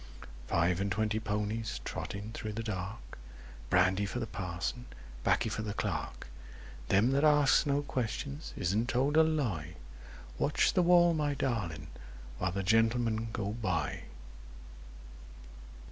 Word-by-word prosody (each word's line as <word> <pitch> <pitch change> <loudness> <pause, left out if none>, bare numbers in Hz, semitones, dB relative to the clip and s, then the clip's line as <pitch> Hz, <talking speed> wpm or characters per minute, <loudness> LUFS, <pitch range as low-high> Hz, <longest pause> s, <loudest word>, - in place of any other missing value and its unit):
Five 85 +2 +2
and 100 0 -1
twenty 110 +2 0
ponies, 105 +1 -2
Trotting 100 +2 -5
through 110 -2 -5
the 115 +2 -4
dark— 95 - -6 0.5
Brandy 95 +2 +3
for 120 - -4
the 115 - -2
Parson, 95 +4 -4 0.4
'Baccy 120 - +2
for 110 - -3
the 105 -1 -4
Clerk; - - -3 0.6
Them 105 - +4
that 140 +2 +2
asks 150 -2 +5
no 140 +1 +1
questions 140 +3 -3
isn't 105 +7 0
told 135 +4 +1
a 160 - +8
lie— 115 - 0 0.6
Watch 150 - +2
the 185 - +4
wall, 175 -1 +6
my 150 -2 0
darling, 105 - -2 0.5
while 90 -1 0
the 100 +2 -2
Gentlemen 115 +2 +2
go 105 -3 -2
by! 90 - -2
110 Hz, 130 wpm, -31 LUFS, 95-130 Hz, 0.6 s, a